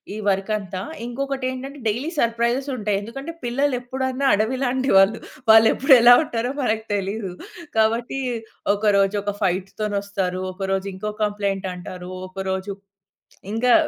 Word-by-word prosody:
ఈ -, -, -5 dB
వర్కంతా 195 Hz, -1 st, -1 dB, 0.2 s
ఇంకొకటేంటంటే 265 Hz, +2 st, -4 dB
daily 245 Hz, +9 st, -1 dB
surprises 235 Hz, +3 st, +1 dB
ఉంటాయి. 210 Hz, -4 st, 0 dB
ఎందుకంటే 270 Hz, +9 st, -7 dB
పిల్లలెప్పుడైనా 260 Hz, +1 st, -1 dB
అడవిలాంటి 255 Hz, +4 st, 0 dB
వాళ్ళు, 195 Hz, +3 st, +5 dB, 0.3 s
వాళ్ళు 220 Hz, 0 st, +8 dB
ఎప్పుడేలా 245 Hz, -3 st, +7 dB
ఉంటారో 245 Hz, -2 st, -2 dB
మనకు 220 Hz, -3 st, 0 dB
తెలీదు. 200 Hz, 0 st, -2 dB, 0.5 s
కాబట్టి 230 Hz, +4 st, +1 dB, 0.5 s
ఒకరోజు 200 Hz, -1 st, +2 dB
ఒక 205 Hz, -, -2 dB
ఫైట్ 185 Hz, +1 st, 0 dB
తోనొస్తారు, 200 Hz, -3 st, -2 dB
ఒకరోజు 195 Hz, +1 st, -2 dB
ఇంకో 210 Hz, +3 st, -4 dB
కంప్లెయింటంటారు 190 Hz, -3 st, -3 dB, 0.2 s
ఒకరోజు 190 Hz, +1 st, -3 dB, 0.8 s
ఇంకా 245 Hz, +2 st, +3 dB
220 Hz, 110 wpm, -22 LUFS, 195-250 Hz, 0.8 s, వాళ్ళు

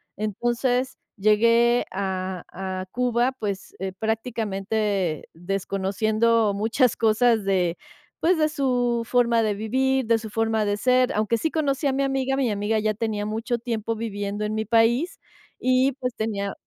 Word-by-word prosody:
Entonces, 240 Hz, +5 st, -1 dB, 0.2 s
llegué 230 Hz, +4 st, +4 dB
a 185 Hz, -2 st, -3 dB
a 185 Hz, 0 st, -4 dB
Cuba, 245 Hz, +1 st, +1 dB
pues, 200 Hz, -3 st, -5 dB
eh, 190 Hz, 0 st, -3 dB
prácticamente 210 Hz, -, -2 dB
desconociendo 200 Hz, +5 st, 0 dB
muchas 225 Hz, +4 st, +1 dB
cosas 225 Hz, 0 st, +3 dB
de, 185 Hz, -3 st, +1 dB, 0.4 s
pues, 350 Hz, +2 st, +3 dB
de 310 Hz, -1 st, +2 dB
su 245 Hz, -6 st, 0 dB
forma 235 Hz, -1 st, +3 dB
de 215 Hz, -1 st, +1 dB
vivir, 260 Hz, +5 st, 0 dB
de 230 Hz, 0 st, +3 dB
su 220 Hz, -1 st, -7 dB
forma 225 Hz, 0 st, 0 dB
de 205 Hz, 0 st, 0 dB
ser. 255 Hz, +2 st, +3 dB
Aunque 215 Hz, +2 st, +1 dB
sí 320 Hz, -, -1 dB
conocí 285 Hz, -2 st, 0 dB
a 270 Hz, -, +1 dB
mi 275 Hz, +1 st, 0 dB
amiga, 270 Hz, -1 st, 0 dB
mi 260 Hz, -5 st, +1 dB
amiga 205 Hz, +2 st, 0 dB
ya 215 Hz, 0 st, 0 dB
tenía 215 Hz, -1 st, -2 dB
mucho 225 Hz, +3 st, -2 dB
tiempo 230 Hz, -1 st, -3 dB
viviendo 205 Hz, -2 st, -4 dB
en 210 Hz, -, -2 dB
mi 220 Hz, 0 st, -1 dB
país 235 Hz, -, +2 dB, 0.4 s
y, 255 Hz, +2 st, +3 dB
pues, 250 Hz, -2 st, -4 dB
tenía 200 Hz, -3 st, -2 dB
225 Hz, 150 wpm, -24 LUFS, 205-245 Hz, 0.4 s, llegué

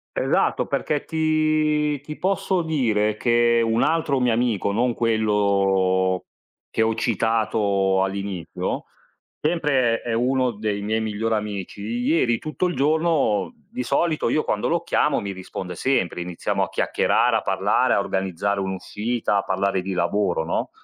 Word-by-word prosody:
Esatto, -, -, +1 dB
perché 150 Hz, -2 st, -2 dB
ti 155 Hz, -2 st, +1 dB
ti 150 Hz, +1 st, -8 dB
posso 190 Hz, -1 st, 0 dB
dire 110 Hz, -9 st, +1 dB
che 120 Hz, 0 st, +3 dB
un 115 Hz, 0 st, +1 dB
altro 160 Hz, -4 st, +1 dB
mio 125 Hz, -2 st, +2 dB
amico, 110 Hz, -4 st, 0 dB
non 120 Hz, +3 st, +1 dB
quello 100 Hz, -4 st, +1 dB, 0.5 s
che 110 Hz, -, 0 dB
ho 110 Hz, 0 st, +2 dB
citato 105 Hz, -4 st, +1 dB
all'inizio, 95 Hz, -3 st, -4 dB, 0.6 s
sempre 145 Hz, -8 st, +1 dB
è 120 Hz, -, -3 dB
uno 125 Hz, +2 st, +1 dB
dei 105 Hz, -1 st, -3 dB
miei 110 Hz, +2 st, 0 dB
migliori 110 Hz, +1 st, -1 dB
amici, 105 Hz, -2 st, -4 dB
ieri 120 Hz, +2 st, +1 dB
tutto 155 Hz, +4 st, -2 dB
il 175 Hz, -, -3 dB
giorno 155 Hz, -, +1 dB, 0.2 s
di 250 Hz, +2 st, -4 dB
solito 165 Hz, -3 st, +1 dB
io 155 Hz, -, +1 dB
quando 105 Hz, -, -1 dB
lo 170 Hz, 0 st, +1 dB
chiamo 150 Hz, -3 st, +1 dB
mi 100 Hz, -1 st, -4 dB
risponde 90 Hz, -1 st, -7 dB
sempre, 95 Hz, -7 st, 0 dB
iniziamo 90 Hz, -1 st, -2 dB
a -, -, -3 dB
chiacchierare, -, -, +2 dB
a -, -, -2 dB
parlare, -, -, +1 dB
a -, -, +2 dB
organizzare 95 Hz, +1 st, -1 dB
un'uscita, 105 Hz, +3 st, -2 dB
a -, -, +2 dB
parlare 95 Hz, 0 st, 0 dB
di 95 Hz, +1 st, -4 dB
lavoro, 85 Hz, -1 st, 0 dB
no, -, -, -2 dB
115 Hz, 145 wpm, -23 LUFS, 100-140 Hz, 0.6 s, che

